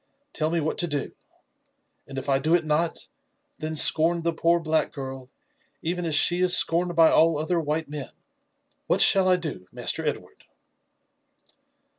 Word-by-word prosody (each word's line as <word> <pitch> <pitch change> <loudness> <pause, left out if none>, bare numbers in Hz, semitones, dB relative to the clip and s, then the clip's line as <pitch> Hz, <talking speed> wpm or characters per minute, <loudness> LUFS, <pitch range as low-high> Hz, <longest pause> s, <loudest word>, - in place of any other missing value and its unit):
Tell 155 0 -2
me 170 +1 -1
what 155 0 -3
to 175 - +1
do; 145 -3 -4 1.0
and 135 - -10
if 135 - -6
I 135 -1 +1
do 155 +5 +1
it 170 -2 -1
not, 155 +2 -2 0.5
then 155 0 -5
scorn 165 +2 +3
the 170 0 -1
poor 170 +1 +1
black 160 -1 -1
girl, 130 -2 -8 0.5
even 175 +1 -3
as 160 -3 0
she 175 +4 +3
is 180 -1 +5
scorned 175 +1 +1
by 165 -1 +5
all 165 -1 +3
other 165 +3 -1
white 155 0 -3
men. 145 -2 -6 0.8
What - - +2
shall 190 -1 +5
I 185 - +4
do. 150 - -6
Master 125 +6 -3
Ed 150 - -1
ward?" - - -21
160 Hz, 170 wpm, -24 LUFS, 150-170 Hz, 1.0 s, is